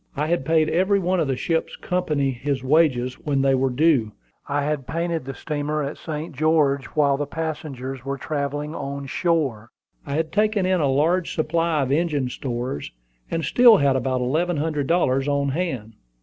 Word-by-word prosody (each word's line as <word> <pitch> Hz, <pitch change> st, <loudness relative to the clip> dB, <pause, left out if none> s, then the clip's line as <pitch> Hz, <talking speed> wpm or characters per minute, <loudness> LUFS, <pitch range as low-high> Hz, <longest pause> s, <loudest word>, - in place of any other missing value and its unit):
I 150 Hz, -, +1 dB
had 165 Hz, -4 st, 0 dB
paid 160 Hz, -1 st, +3 dB
every 190 Hz, +5 st, +2 dB
one 185 Hz, -1 st, 0 dB
of 160 Hz, -, +1 dB
the 135 Hz, -, 0 dB
ship's 165 Hz, +3 st, -1 dB
company 155 Hz, -7 st, -1 dB
his 130 Hz, +1 st, -3 dB
wages 130 Hz, -3 st, +2 dB
when 140 Hz, -4 st, +1 dB
they 135 Hz, 0 st, +3 dB
were 135 Hz, 0 st, +2 dB
due; 130 Hz, -5 st, +2 dB, 0.3 s
I 145 Hz, 0 st, 0 dB
had 145 Hz, -3 st, -2 dB
painted 165 Hz, -3 st, -2 dB
the 135 Hz, -, -6 dB
steamer 150 Hz, 0 st, -2 dB
at 140 Hz, +2 st, -5 dB
St. 155 Hz, -1 st, -5 dB
George, 145 Hz, -2 st, +2 dB
while 140 Hz, -2 st, +3 dB
the 145 Hz, 0 st, -3 dB
passengers 140 Hz, -5 st, -5 dB
were 140 Hz, +1 st, -3 dB
travelling 145 Hz, +1 st, -3 dB
on 140 Hz, -2 st, -5 dB
shore; 135 Hz, -, -1 dB, 0.4 s
I 140 Hz, -, -2 dB
had 160 Hz, 0 st, -1 dB
taken 210 Hz, -2 st, +2 dB
in 185 Hz, -2 st, +2 dB
a 140 Hz, -, +2 dB
large 165 Hz, +6 st, +1 dB
supply 165 Hz, -1 st, +1 dB
of 130 Hz, -, -2 dB
engine 145 Hz, -4 st, +1 dB
stores; 120 Hz, -, -4 dB, 0.4 s
and 165 Hz, -2 st, -2 dB
still 240 Hz, -, +7 dB
had 140 Hz, -2 st, +3 dB
about 130 Hz, 0 st, 0 dB
eleven 160 Hz, +7 st, 0 dB
hundred 150 Hz, -2 st, -1 dB
dollars 135 Hz, -6 st, +2 dB
on 140 Hz, -1 st, +1 dB
hand. 130 Hz, -8 st, -3 dB
145 Hz, 180 wpm, -23 LUFS, 135-165 Hz, 0.4 s, still